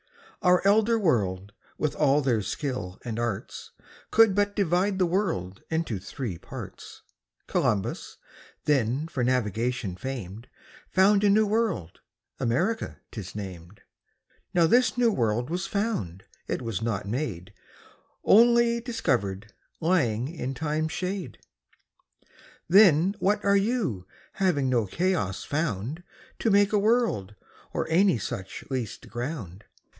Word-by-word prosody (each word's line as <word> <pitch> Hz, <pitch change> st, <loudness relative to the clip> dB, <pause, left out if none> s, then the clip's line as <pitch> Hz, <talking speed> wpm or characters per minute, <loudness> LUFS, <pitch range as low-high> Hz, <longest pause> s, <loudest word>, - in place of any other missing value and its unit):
Our 180 Hz, -1 st, +4 dB
Elder 220 Hz, +3 st, +4 dB
World, 100 Hz, -, 0 dB, 0.2 s
with 150 Hz, -, -1 dB
all 145 Hz, -1 st, +3 dB
their 125 Hz, -6 st, +1 dB
Skill 100 Hz, -6 st, -4 dB
and 115 Hz, -1 st, -3 dB
Arts, 120 Hz, -5 st, -4 dB, 0.4 s
Could 225 Hz, -3 st, +5 dB
but 205 Hz, +1 st, +1 dB
divide 190 Hz, 0 st, +1 dB
the 185 Hz, -, +3 dB
World 165 Hz, -, -1 dB
into 160 Hz, -, -1 dB
three 100 Hz, -, -6 dB
Parts: -, -, -10 dB, 0.4 s
Columbus, 100 Hz, -3 st, -1 dB, 0.5 s
then 135 Hz, +1 st, +1 dB
for 140 Hz, -7 st, -2 dB
Navigation 120 Hz, -4 st, -1 dB
fam'd, 115 Hz, -1 st, -6 dB, 0.4 s
Found 200 Hz, +2 st, +4 dB
a 205 Hz, -, +5 dB
new 215 Hz, +2 st, +4 dB
World, 205 Hz, -, -1 dB, 0.4 s
America 155 Hz, -, -1 dB
'tis 100 Hz, -5 st, -8 dB
nam'd; 95 Hz, -2 st, -8 dB, 0.7 s
Now 170 Hz, -1 st, +5 dB
this 245 Hz, +8 st, +3 dB
new 240 Hz, -2 st, +4 dB
World 120 Hz, -, 0 dB
was 180 Hz, +2 st, -2 dB
found, 110 Hz, -, -2 dB, 0.2 s
it -, -, -3 dB
was 115 Hz, -4 st, -3 dB
not 110 Hz, -4 st, -2 dB
made, 105 Hz, -, -4 dB, 0.7 s
Onely 235 Hz, +1 st, +5 dB
discovered, 115 Hz, -, -2 dB, 0.3 s
lying 135 Hz, -10 st, +1 dB
in 135 Hz, -4 st, -5 dB
Time's 155 Hz, +1 st, -1 dB
shade. 180 Hz, -, -4 dB, 1.3 s
Then 185 Hz, -1 st, +6 dB
what 205 Hz, +2 st, +1 dB
are 200 Hz, 0 st, +5 dB
You, 195 Hz, -, -1 dB, 0.3 s
having 165 Hz, -9 st, +1 dB
no 120 Hz, -5 st, +1 dB
Chaos 170 Hz, -, -1 dB
found 145 Hz, -, -2 dB, 0.4 s
To 225 Hz, -, +1 dB
make 205 Hz, 0 st, +4 dB
a 210 Hz, -, +4 dB
World, 210 Hz, -, +1 dB, 0.4 s
or -, -, -2 dB
any 185 Hz, -3 st, +4 dB
such 95 Hz, -2 st, -6 dB
least 125 Hz, -6 st, -4 dB
ground? 120 Hz, -, -6 dB
145 Hz, 125 wpm, -27 LUFS, -, 1.3 s, Then